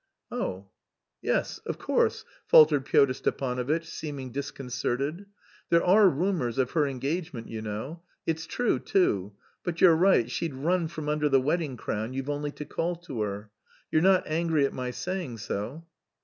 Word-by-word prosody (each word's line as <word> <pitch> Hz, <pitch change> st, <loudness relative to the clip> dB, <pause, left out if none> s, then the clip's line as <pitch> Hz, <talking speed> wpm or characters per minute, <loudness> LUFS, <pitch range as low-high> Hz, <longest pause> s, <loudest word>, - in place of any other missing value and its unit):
"Oh!... 95 Hz, +1 st, -4 dB, 0.5 s
Yes, -, -, 0 dB
of -, -, -3 dB
course," -, -, +1 dB, 0.2 s
faltered 150 Hz, -3 st, +7 dB
Pyotr 135 Hz, -1 st, +4 dB
Stepanovitch, 130 Hz, +5 st, -1 dB
seeming 140 Hz, -5 st, -6 dB
disconcerted. 140 Hz, -, -3 dB, 0.4 s
"There 170 Hz, 0 st, +4 dB
are 195 Hz, +2 st, +7 dB
rumours 160 Hz, -, -1 dB
of 130 Hz, -2 st, +1 dB
her 150 Hz, -3 st, +2 dB
engagement, 140 Hz, 0 st, -3 dB
you 110 Hz, -1 st, -5 dB
know. 110 Hz, +10 st, -5 dB, 0.2 s
It's 160 Hz, 0 st, -2 dB
true, 245 Hz, -2 st, 0 dB
too. 100 Hz, -, +1 dB, 0.3 s
But 175 Hz, -1 st, -3 dB
you're 170 Hz, -3 st, +7 dB
right, 175 Hz, -8 st, +4 dB
she'd 140 Hz, +3 st, -3 dB
run 165 Hz, +5 st, +1 dB
from 155 Hz, -2 st, -6 dB
under 150 Hz, 0 st, +1 dB
the 135 Hz, -1 st, +5 dB
wedding 145 Hz, -1 st, -1 dB
crown, 110 Hz, +2 st, -3 dB
you've 135 Hz, +2 st, -3 dB
only 145 Hz, 0 st, -2 dB
to 150 Hz, -, -7 dB
call 175 Hz, +4 st, -2 dB
to 165 Hz, -9 st, -6 dB
her. 105 Hz, 0 st, -4 dB, 0.4 s
You're 155 Hz, -, +3 dB
not 185 Hz, +1 st, +4 dB
angry 160 Hz, -2 st, +1 dB
at -, -, -2 dB
my 125 Hz, -1 st, -3 dB
saying 170 Hz, -2 st, -4 dB
so?" 115 Hz, +9 st, -5 dB
145 Hz, 160 wpm, -28 LUFS, 125-170 Hz, 0.5 s, faltered